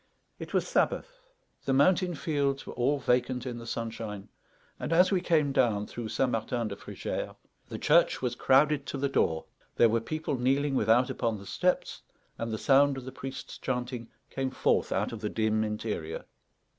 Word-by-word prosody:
It - - -7
was - - +1
Sabbath; - - 0 0.4
the 135 - +1
mountain 175 +5 +3
fields 140 -3 -1
were - - -7
all 130 +4 +1
vacant 125 -1 0
in 120 -2 -4
the 115 - -9
sunshine; 110 -3 -5 0.5
and - - -4
as 180 +4 +5
we 190 -2 +2
came 155 -5 +2
down 115 -7 +2
through 115 0 -6
St. 130 +2 +1
Martin 115 0 -1
de 100 - -5
Frugères, - - -5 0.3
the - - -5
church 170 +3 +4
was 125 -2 -1
crowded 140 +3 +3
to - - -3
the 140 +1 0
door, 80 -12 +1 0.3
there 115 - +5
were 115 +1 +1
people 155 0 -3
kneeling 135 +3 +2
without 120 +1 +3
upon 115 -2 -1
the 100 - -11
steps, 180 - 0 0.4
and 115 0 -3
the 110 - -2
sound 140 +2 +4
of 130 - -7
the 130 - -6
priest's 135 0 -7
chanting 125 -2 -3 0.2
came 135 -1 -1
forth - - +1
out - - 0
of 115 -3 -7
the 105 - -2
dim 110 0 +1
interior. 105 -7 -4
125 Hz, 180 wpm, -29 LUFS, 115-140 Hz, 0.5 s, as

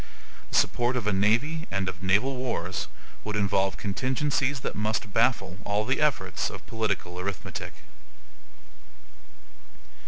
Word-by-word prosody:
The - - -3
support 120 +1 +3
of 120 - -2
a 105 - +2
navy 120 +12 +2
and 95 0 0
of 95 -1 -4
naval 105 +9 +3
wars 105 -9 -2 0.4
would 105 0 -3
involve 95 -2 +2
contingencies 130 +5 0
that - - -2
must 105 -1 -1
baffle 110 -6 +2
all 105 +1 +1
the 130 +5 +1
efforts 95 - +1
of - - -9
political 100 -5 -2
arithmetic. 95 -1 -4
105 Hz, 125 wpm, -28 LUFS, 95-130 Hz, 0.4 s, support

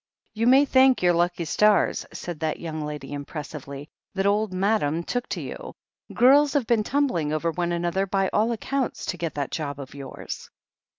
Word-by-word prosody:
"You 225 +2 0
may 270 +3 +6
thank 260 -4 +4
your 175 0 +5
lucky 175 0 0
stars," 210 +6 +2
said 175 -3 -6
that 160 -1 -2
young 160 -2 -5
lady 150 -2 -6
impressively, 145 -1 -7 0.3
"that 195 0 0
old 205 +1 +2
M^dam 185 -4 0
took 245 0 -3
to - - -3
you. - - -7 0.4
Girls 280 +3 +5
have 280 -5 +1
been 225 -2 +2
tumbling 225 - 0
over 155 +2 0
one 175 +1 -2
another, 175 +3 0
by 195 0 +1
all 220 +3 +2
accounts, 260 +3 -2
to 175 - -3
get 165 -1 -4
that 140 -2 -3
job 145 -3 -4
of 135 -1 -8
yours." 140 -1 -8
175 Hz, 180 wpm, -25 LUFS, 155-225 Hz, 0.4 s, may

